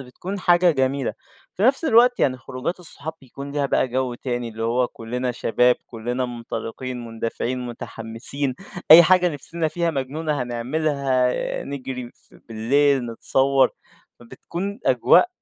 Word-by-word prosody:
بتكون 175 +10 -7
حاجة 175 0 +4
جميلة. 135 -2 0 0.4
في 190 - -4
نفس 265 +7 +3
الوقت 245 -2 +5
يعني 130 -2 +2
خروجات 130 +8 -5
الصحاب 160 -2 -6
بيكون 140 +1 -9
ليها 145 -1 0
بقى 130 - +1
جَو 130 0 -1
تاني 120 -1 -3
اللي 115 0 -7
هو 120 +2 +1
كُلّنا 125 +2 -4
شباب، 125 +1 +2
كُلّنا 120 +2 -3
منطلقين، 120 +1 -6
مندفعين، 115 +2 -3
متحمّسين، 120 +3 -3 0.4
أي 165 +2 +12
حاجة 180 +1 +4
نفسنا 160 +2 -3
فيها 170 +1 -1
مجنونة 145 +1 -2
هنعملها، 130 +1 0
آآ - - -3
نجري 130 -3 -6
ف - - -21
بالليل، 130 +4 +2
نتصوّر، 135 +3 +2 0.5
فبتكون 170 - -6
أجواء - - +5
130 Hz, 135 wpm, -22 LUFS, 120-155 Hz, 0.5 s, أي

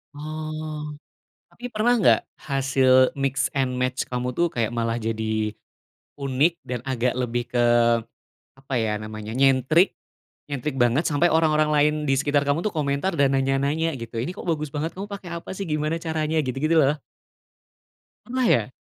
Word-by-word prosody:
Oh, 155 0 -5 0.6
tapi 245 - -7
pernah 235 +1 +1
nggak - - +5 0.2
hasil 135 -2 +3
mix 135 -1 -1
and 130 -2 0
match 125 0 -1
kamu 125 0 -2
tuh 170 +6 +1
kayak 115 -5 -2
malah 115 -1 -1
jadi 110 -1 -2 0.6
unik 140 +4 +1
dan 125 0 -4
agak 125 -1 0
lebih 120 -1 -1
ke, 120 -1 +3 0.8
apa 135 0 -8
ya 105 -1 0
namanya, 110 0 -7
nyentrik 135 +6 +4 0.5
nyentrik 140 -1 -3
banget, 120 +6 +3
sampai 155 +3 +2
orang-orang 155 -2 +3
lain 150 0 +4
di 135 - +3
sekitar 145 +1 +1
kamu 145 +4 +1
tuh 215 - 0
komentar 150 +2 -1
dan 135 -1 +4
nanya-nanya 140 +4 +1
gitu, 115 0 -8
"Ini 120 +10 -2
kok 185 - -9
bagus 155 -3 -1
banget, 155 +4 -3
kamu 195 - -5
pakai 185 -4 -6
apa 170 - -7
sih 190 -1 -5
gimana 155 +2 -1
caranya? 160 -1 -1
Gitu-gitu 155 +4 +1
loh. 145 +1 +3 1.3
Pernah 255 0 -1
ya? 120 - +2
140 Hz, 155 wpm, -24 LUFS, 125-155 Hz, 1.3 s, nggak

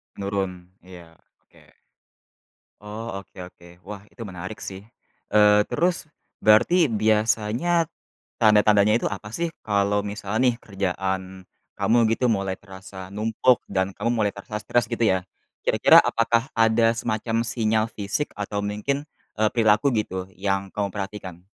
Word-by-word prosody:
Menurun. 95 -3 -4 0.2
Iya, 85 -3 -14 0.3
oke. - - -23 1.1
Oh, 105 -1 -6
oke 95 - -25
oke. 85 -1 -16 0.2
Wah! 100 -1 -8
Itu 115 - -10
menarik 95 +2 -7
sih. 95 0 -7 0.5
Eee, 105 0 +6
terus, 175 0 0 0.3
berarti 130 +9 +5
biasanya, 110 +9 +1 0.6
tanda-tandanya 105 -1 +5
itu - - 0
apa 100 +1 -7
sih? 170 +4 -1 0.2
Kalau 100 -1 +1
misal 105 +1 -4
nih, 125 -2 +2
kerjaan, 95 -2 -4 0.3
kamu 115 +2 +2 0.2
gitu 125 - -1
mulai 95 -2 -1
terasa 95 -1 -11
numpuk, 110 +4 +2
dan 95 0 0
kamu 115 - -1
mulai 105 -3 +1
terasa 105 +2 -6
stress 120 +2 +1
gitu 115 -1 -1
ya, 95 -3 +3 0.4
kira-kira - - +5
apakah 115 +2 +1
ada 115 0 +3
semacam 115 0 -1
sinyal 110 -2 +1
fisik 105 +8 -3
atau 105 0 -3
mungkin, 105 +8 -2 0.3
eee, 110 0 +3
perilaku 110 +2 +3
gitu, 95 -4 -2
yang 95 0 -2
kamu 100 -1 -1
perhatikan? 95 -3 -7
105 Hz, 135 wpm, -24 LUFS, 95-115 Hz, 1.1 s, Eee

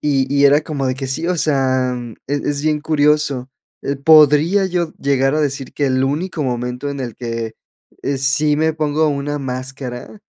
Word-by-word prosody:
y 140 -3 +1
y 140 - +4
era 145 +2 +6
como 145 -3 -3
de 130 - 0
que 135 0 -5
sí, 150 +6 -2
o 180 - 0
sea, 130 -4 +1 0.3
es 145 0 0
es 145 0 -1
bien 155 -1 +1
curioso, 150 -4 +1 0.3
eh, 140 0 -2
podría 155 +6 +5
yo 175 -3 -2
llegar 135 0 +1
a 155 - +1
decir 135 -2 -2
que 145 - 0
el 130 0 +1
único 155 +3 -2
momento 125 +2 -3
en 140 - -5
el 120 -4 -5
que, 115 -2 -4 0.5
eh, 140 -1 -1
sí 135 +3 +2
me 160 +1 +1
pongo 155 0 +1
una 145 0 -2
máscara, 130 - -6
140 Hz, 185 wpm, -18 LUFS, 130-150 Hz, 0.5 s, era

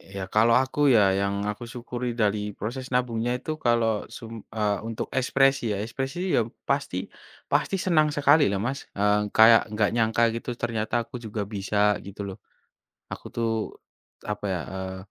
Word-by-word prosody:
Ya 95 -1 -4
kalau 110 +3 +3
aku 135 +2 +2
ya, 115 - +6 0.2
yang 100 +1 -1
aku 105 - -9
syukuri 125 0 -4
dari 105 0 +2 0.2
proses 125 +5 -4
nabungnya 120 -1 0
itu 155 - -5
kalau 115 -1 +3 0.2
sum 115 -2 -9 0.2
eee, 105 -2 +1
untuk 115 - -4
ekspresi 135 -2 +2
ya 100 - -1
ekspresi 135 +7 -4 0.2
ya - - +4 0.3
pasti 140 -9 0 0.5
pasti - - +2
senang 155 -4 +4
sekali 145 +1 +4
lah 100 - -1
Mas. 135 +3 -2
Eee, 105 +1 +2 0.2
kayak 110 +1 +8
enggak 105 -1 +2
nyangka 115 0 +2
gitu 115 - -5
ternyata 110 -2 -2
aku - - -11
juga 110 0 -4
bisa 105 0 +1
gitu 100 +1 -8
loh. 95 - -7 0.7
Aku - - -8
tuh 115 -1 0 0.7
apa 105 0 -5
ya, 90 - -2
eee, 95 0 -5
115 Hz, 165 wpm, -26 LUFS, 105-130 Hz, 0.7 s, kayak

